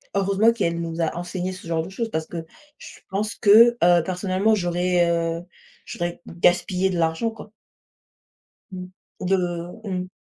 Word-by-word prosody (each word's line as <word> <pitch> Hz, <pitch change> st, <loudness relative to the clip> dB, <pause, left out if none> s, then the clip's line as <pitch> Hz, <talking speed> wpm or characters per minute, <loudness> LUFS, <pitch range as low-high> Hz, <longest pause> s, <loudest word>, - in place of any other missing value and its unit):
heureusement 200 Hz, +3 st, +3 dB
qu'elle 170 Hz, -7 st, -1 dB
nous 165 Hz, 0 st, -5 dB
a 165 Hz, -, -1 dB
enseigné 175 Hz, +1 st, -4 dB
ce 185 Hz, -2 st, -11 dB
genre 165 Hz, -1 st, 0 dB
de 170 Hz, -, -8 dB
choses 225 Hz, +4 st, -4 dB
parce 160 Hz, -5 st, -3 dB
que 165 Hz, 0 st, -7 dB, 0.3 s
je -, -, -12 dB
pense 205 Hz, +2 st, -2 dB
que, 230 Hz, +4 st, +6 dB
heu, 175 Hz, -1 st, +5 dB
personnellement, 185 Hz, +4 st, +1 dB
j'aurais, 175 Hz, -1 st, +1 dB
heu, 165 Hz, 0 st, -1 dB, 0.4 s
j'aurais 175 Hz, 0 st, -4 dB
gaspillé 180 Hz, +2 st, +1 dB
de 180 Hz, -, -2 dB
l'argent, 165 Hz, +7 st, 0 dB
quoi. 220 Hz, -2 st, -12 dB, 1.2 s
Mmh. 180 Hz, -1 st, -7 dB, 0.4 s
De 195 Hz, -, +3 dB, 0.5 s
mmh. 185 Hz, -2 st, -3 dB
180 Hz, 155 wpm, -23 LUFS, 170-195 Hz, 1.2 s, que